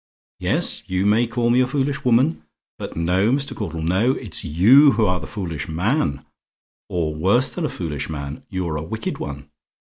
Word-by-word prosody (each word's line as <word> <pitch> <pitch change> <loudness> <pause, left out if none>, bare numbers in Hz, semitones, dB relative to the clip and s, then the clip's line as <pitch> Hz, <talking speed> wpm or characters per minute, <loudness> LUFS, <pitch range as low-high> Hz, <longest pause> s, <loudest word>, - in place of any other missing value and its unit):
Yes, - - +1
you 95 +1 0
may 110 +3 +3
call 120 0 0
me 125 +2 +4
a 125 - +2
foolish 140 +1 -1
woman; 115 -11 +2 0.4
but - - -6
no, 90 +6 +1
Mr. 140 +1 -1
Caudle, 85 -6 -4
no; 95 +10 +2
it's 110 -10 -6
you 115 - +6
who 110 0 +2
are 90 -1 +1
the - - -8
foolish 85 - -5
man; 85 - -1 0.6
or 80 -3 -1
worse 100 +12 +2
than 175 - -3
a - - -1
foolish 80 - -5
man; 70 0 -6
you're 90 -4 -3
a 75 - -4
wicked 110 +7 -4
one. 70 0 -7
95 Hz, 180 wpm, -21 LUFS, 80-120 Hz, 0.6 s, you